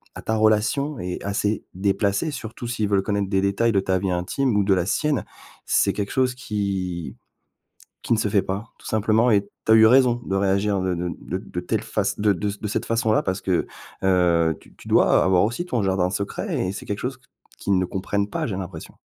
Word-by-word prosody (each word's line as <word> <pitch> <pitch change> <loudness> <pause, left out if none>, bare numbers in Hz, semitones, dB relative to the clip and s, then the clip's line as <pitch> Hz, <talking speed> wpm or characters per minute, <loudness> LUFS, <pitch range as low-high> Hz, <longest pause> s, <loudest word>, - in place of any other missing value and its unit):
à - - -7
ta 110 - 0
relation 110 +7 +2
est 90 0 -5
assez 105 +1 -1
déplacée, 100 - 0
surtout 120 -2 -7
s'ils 110 -3 -1
veulent 100 -1 +2
connaître 100 -1 -1
des 95 -1 +2
détails 100 +4 +2
de 100 - +3
ta 95 -1 0
vie 95 - -2
intime 105 +7 0
ou 100 - +3
de 100 0 +3
la 90 -2 +1
sienne, 150 +4 0 0.4
c'est - - +2
quelque 100 -1 -3
chose 130 -1 +1
qui 95 - -3 0.9
qui - - +1
ne 110 - -1
se 105 - +1
fait 100 -1 +3
pas 95 +3 -3
tout - - -15
simplement 110 +2 +2
et 100 -2 +3 0.2
tu 110 - +5
as - - +8
eu 110 - +7
raison 120 0 +4
de 95 - -2
réagir 100 +1 +1
de 95 -1 0
de 90 0 -3
de - - -4
de - - -6
telle - - -2
face - - -2
de 105 0 +3
de 100 +2 -2
ce 100 +1 -4
de 105 - -5
cette - - -2
façon-là 115 -1 +2
parce 95 +1 -2
que, 90 -3 0 0.4
heu, 85 -4 +3
tu - - -20
tu - - -13
dois - - +4
avoir 95 0 +4
aussi 120 +11 -2
ton 125 -11 -1
jardin 95 -2 +1
secret 100 -1 -2
et - - -2
c'est - - -8
quelque 100 - -3
chose - - -4
qu - - -30 0.3
qu'ils 100 -2 +1
ne 90 - +1
comprennent 100 +2 -2
pas, 160 +7 -2
j'ai 100 -7 -3
l'impression. 95 -3 -7
100 Hz, 225 wpm, -23 LUFS, 95-110 Hz, 0.9 s, as